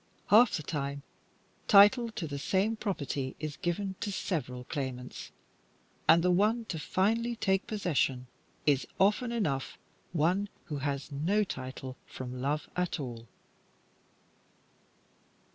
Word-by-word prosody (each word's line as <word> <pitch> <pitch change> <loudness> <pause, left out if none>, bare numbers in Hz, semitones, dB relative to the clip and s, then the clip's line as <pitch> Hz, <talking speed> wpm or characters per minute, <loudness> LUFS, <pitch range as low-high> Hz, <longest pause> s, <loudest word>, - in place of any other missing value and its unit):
Half 225 +3 +7
the 155 - -6
time, 140 -1 -3 0.6
title 210 +4 +7
to 170 - -3
the 145 -2 -4
same 195 +9 +1
property 145 - -3
is 155 -1 -4
given 190 +3 -2
to 205 - -2
several 140 -10 -3
claimants, 130 -3 -5 0.8
and 170 0 +7
the 180 - +4
one 215 +6 +2
to 160 - -3
finally 225 +9 +1
take 195 -3 +1
possession 155 - 0 0.4
is 140 -3 +3
often 210 +5 +3
enough 155 - -1 0.3
one 180 +5 +1 0.2
who 150 -6 -4
has 140 +1 -3
no 175 +10 +1
title 130 -5 -6
from 125 -1 -6
love 145 +3 -1
at 180 -2 -1
all. 120 -4 -6
165 Hz, 125 wpm, -30 LUFS, 140-205 Hz, 0.8 s, Half